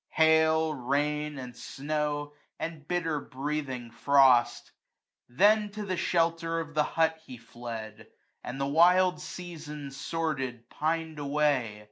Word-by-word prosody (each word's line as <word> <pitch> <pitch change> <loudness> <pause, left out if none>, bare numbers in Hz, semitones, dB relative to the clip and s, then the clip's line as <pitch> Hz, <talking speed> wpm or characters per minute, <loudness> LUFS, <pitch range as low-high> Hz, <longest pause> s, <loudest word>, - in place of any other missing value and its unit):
Hail, 160 0 +4
rain, 150 +3 -1
and 125 -2 -8
snow, 145 +2 -3 0.2
and 160 -3 -6
bitter 165 -4 -1
breathing 135 -4 -4
frost: 125 -2 +4 0.6
Then 210 - +4
to 210 0 -5
the 185 -2 -1
shelter 165 -1 0
of 160 -1 -6
the 155 - +3
hut 160 +1 +1
he 130 -5 -10
fled; 115 -2 -8 0.4
And 125 +2 -6
the 135 - 0
wild 180 +5 +4
season, 150 -5 -7
sordid, 135 -5 -3
pin'd 160 0 -2
away. 140 -7 0
150 Hz, 120 wpm, -29 LUFS, 135-165 Hz, 0.6 s, Hail